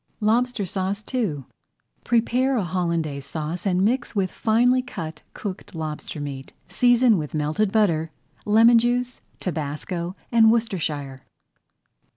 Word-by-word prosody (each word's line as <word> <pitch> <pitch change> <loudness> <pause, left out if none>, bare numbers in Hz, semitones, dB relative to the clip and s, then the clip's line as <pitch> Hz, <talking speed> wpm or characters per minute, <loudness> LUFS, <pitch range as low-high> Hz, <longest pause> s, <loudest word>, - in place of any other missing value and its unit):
LOBSTER 230 0 +1
SAUCE 195 +2 -3
II 190 - -1 0.6
Prepare 250 +3 +2
a 215 - +1
Hollandaise 170 -5 -2
Sauce 160 +5 -4
and 185 0 +2
mix 240 +1 -1
with 190 -3 0
finely 245 +3 +3
cut 165 -11 -7
cooked 190 -4 -7
lobster 155 -1 -5
meat. 140 -2 -6
Season 245 -4 +4
with 150 0 -5
melted 155 +7 0
butter, 170 -8 +2 0.3
lemon 230 +3 +6
juice, 245 +1 -1 0.2
tabasco, 170 +2 -4 0.2
and 225 -2 +6
Worcestershire. 155 - -2
195 Hz, 120 wpm, -24 LUFS, 160-235 Hz, 0.6 s, lemon